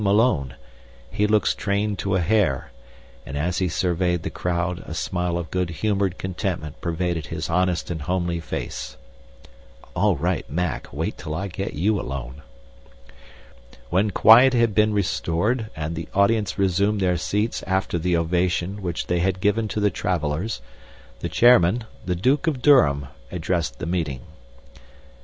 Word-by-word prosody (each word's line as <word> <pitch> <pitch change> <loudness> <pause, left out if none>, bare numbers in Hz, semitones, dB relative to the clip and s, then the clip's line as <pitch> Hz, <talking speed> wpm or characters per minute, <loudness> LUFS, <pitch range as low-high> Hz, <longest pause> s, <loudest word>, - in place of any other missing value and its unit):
Malone, 100 - +2 0.6
he 105 - +1
looks 105 0 +3
trained 100 0 -1
to 95 -1 0
a - - +2
hair, 85 - +1 0.5
and 70 - -6
as 85 +5 -1
he 95 -1 +1
surveyed 90 0 0
the - - -4
crowd 90 0 -2
a - - -6
smile 90 -1 -1
of 85 -2 -5
good 90 -2 0
humored 100 +1 -1
contentment 90 -4 -4
pervaded 85 -2 -2
his - - -4
honest 90 -1 +1
but 85 -3 -4
homely 85 0 -1
face." 80 - -5 1.0
(All - - +3
right, - - -2
Mac, 90 +1 -2
wait - - -3
till 75 - -5
I 100 +4 -3
get 95 0 -4
you 100 +7 +1
alone!) 65 +1 -6 1.5
"When 95 +5 +2
quiet 120 +6 +7
had 115 -3 +3
been 110 +1 +3
restored 105 +3 0
and 80 +1 -4
the 80 -1 -6
audience 100 -1 +2
resumed 100 +2 +2
their 90 -2 +2
seats 105 +7 -1
after 95 -2 0
the 90 +1 +1
ovation 90 +3 0
which 85 -2 -3
they 90 0 0
had 95 +1 0
given 105 +3 +1
to 105 - -3
the 105 -1 +2
travelers, 85 +3 -2 0.6
the - - -3
chairman, 120 -2 +5 0.2
the 90 - -1
Duke 130 - +1
of 135 -6 -1
Durham, 70 - +5 0.3
addressed 85 -7 -2
the - - -5
meeting. 80 -7 -2
90 Hz, 150 wpm, -23 LUFS, 85-105 Hz, 1.5 s, quiet